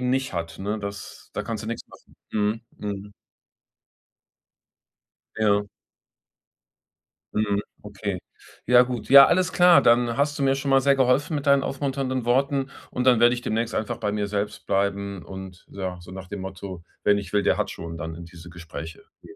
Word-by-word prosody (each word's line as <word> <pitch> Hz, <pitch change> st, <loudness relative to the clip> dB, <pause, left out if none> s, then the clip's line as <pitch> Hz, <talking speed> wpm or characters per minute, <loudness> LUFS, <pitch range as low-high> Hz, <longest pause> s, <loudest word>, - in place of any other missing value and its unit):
eben 125 Hz, 0 st, 0 dB
nicht 130 Hz, -2 st, 0 dB
hat, 85 Hz, -1 st, -4 dB
ne, 105 Hz, +3 st, -2 dB
das 100 Hz, -1 st, -8 dB
da -, -, -3 dB
kannst 110 Hz, -2 st, -4 dB
du 110 Hz, -, -5 dB
nichts 115 Hz, -, -5 dB
machen. -, -, -18 dB, 0.2 s
Mhm, 105 Hz, +1 st, 0 dB, 0.2 s
mhm. 100 Hz, 0 st, -6 dB, 2.2 s
Ja. 105 Hz, -1 st, +2 dB, 1.7 s
Mhm. 105 Hz, -1 st, +1 dB, 0.2 s
Okay. 100 Hz, -2 st, -5 dB, 0.5 s
Ja, 125 Hz, +1 st, +7 dB
gut. 125 Hz, -2 st, -5 dB
Ja, 140 Hz, 0 st, +10 dB
alles 185 Hz, 0 st, +2 dB
klar. 175 Hz, -1 st, +7 dB
Dann 120 Hz, 0 st, +3 dB
hast 145 Hz, +1 st, +1 dB
du 140 Hz, -, -1 dB
mir 135 Hz, 0 st, +3 dB
schon 140 Hz, 0 st, -3 dB
mal 135 Hz, 0 st, +5 dB
sehr 140 Hz, +1 st, +4 dB
geholfen 135 Hz, +5 st, +2 dB
mit 145 Hz, 0 st, -3 dB
deinen 140 Hz, -1 st, +5 dB
aufmunternden 135 Hz, -3 st, -2 dB
Worten. 135 Hz, +2 st, +1 dB, 0.2 s
Und 125 Hz, -, -2 dB
dann 125 Hz, -3 st, +5 dB
werde 120 Hz, +1 st, +6 dB
ich 120 Hz, -, -4 dB
demnächst 115 Hz, 0 st, -2 dB
einfach 115 Hz, +2 st, -2 dB
bei 105 Hz, -3 st, -2 dB
mir 105 Hz, -1 st, -1 dB
selbst 105 Hz, 0 st, -3 dB
bleiben. 100 Hz, -1 st, -1 dB
Und 95 Hz, -2 st, -10 dB
ja, 95 Hz, -2 st, -5 dB
so 90 Hz, +1 st, -12 dB
nach 95 Hz, 0 st, -8 dB
dem 100 Hz, 0 st, -6 dB
Motto: 95 Hz, -2 st, -7 dB, 0.2 s
„Wer 105 Hz, -, +5 dB
nicht 100 Hz, -1 st, -5 dB
will, 100 Hz, -1 st, +3 dB
der -, -, +2 dB
hat -, -, -1 dB
schon,“ 85 Hz, 0 st, -7 dB
dann 80 Hz, -1 st, -5 dB
in 85 Hz, +1 st, -9 dB
diese 85 Hz, 0 st, -12 dB
Gespräche 80 Hz, -1 st, -9 dB, 0.2 s
gehen. -, -, -14 dB
105 Hz, 185 wpm, -24 LUFS, 95-130 Hz, 2.2 s, Ja